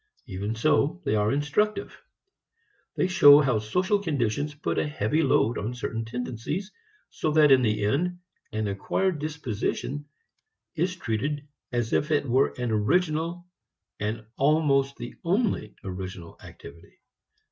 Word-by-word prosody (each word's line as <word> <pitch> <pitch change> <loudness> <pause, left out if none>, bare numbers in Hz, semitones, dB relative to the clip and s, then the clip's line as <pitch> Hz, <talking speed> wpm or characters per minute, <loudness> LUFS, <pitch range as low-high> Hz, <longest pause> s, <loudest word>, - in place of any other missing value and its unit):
Even 100 -1 -4
so 150 +6 +2
they - - +1
are 105 0 +2
instructive. 150 +10 0 1.0
They - - +1
show 145 -6 +8
how 130 -7 +2
social 180 - +1
conditions 145 - -1
put 145 - -2
a - - 0
heavy 150 +1 0
load 120 -5 +2
on 115 +5 -4
certain 115 -2 -4
tendencies, 125 - -4 0.4
so - - -2
that 150 -2 +6
in 130 -1 +7
the 105 -3 +1
end 175 +11 0 0.3
an 110 -1 -2
acquired 155 - -1
disposition 145 -1 -3 0.7
is 180 +3 -1
treated 145 - -3 0.2
as 120 -2 -1
if 150 - +1
it 145 -2 +1
were 130 +3 +3
an 125 -2 -2
original, 165 - 0 0.5
and 110 +1 -3
almost 140 -1 +2
the 120 - -7
only 185 - 0
original 90 -2 -7
activity. 75 +4 -13
140 Hz, 135 wpm, -26 LUFS, 110-155 Hz, 1.0 s, show